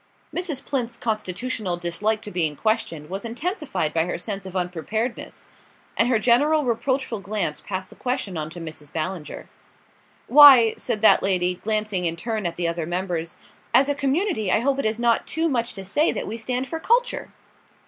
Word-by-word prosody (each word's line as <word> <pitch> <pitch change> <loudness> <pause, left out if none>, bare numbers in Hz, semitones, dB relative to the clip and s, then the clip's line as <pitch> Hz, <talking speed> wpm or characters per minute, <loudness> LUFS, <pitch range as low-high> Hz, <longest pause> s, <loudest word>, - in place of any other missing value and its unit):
Mrs. 320 -7 -3
Plinth's 245 -4 -2
constitutional 215 -2 -2
dislike 205 +6 -1
to 210 - -7
being 160 -4 0
questioned 170 -7 -1
was 195 +3 -5
intensified 240 - -2
by 165 0 +2
her 175 - -3
sense 195 +1 -5
of 190 - -10
unpreparedness; 185 +7 -3 0.5
and 245 - +3
her 255 - +3 0.5
reproachful 255 -1 -1
glance 195 -6 -3
passed 190 -2 -5
the - - -13
question 250 -7 -2
on 155 -1 -3
to 170 +2 -9
Mrs. 155 -3 -9
Ballinger. 165 0 -5 0.8
"Why," 260 -5 +9
said 210 - -2
that 220 - +6
lady, 180 -2 +1
glancing 210 -1 -1
in 165 -1 +1
turn 215 +1 -2
at 170 - -5
the 175 -1 -1
other 165 -1 -2
members, 175 -2 -3 0.4
"as 270 +3 +5
a - - +3
community 275 - 0
I - - +4
hope 275 +2 +1
it - - -1
is 220 +1 -2
not 235 -1 +2
too 325 +1 0
much 240 -5 -1
to 195 -1 -7
say 295 - +2
that - - -4
we 215 - -5
stand 250 +3 -3
for 325 - -4
culture." 485 +7 +1
215 Hz, 180 wpm, -23 LUFS, 180-255 Hz, 0.8 s, Why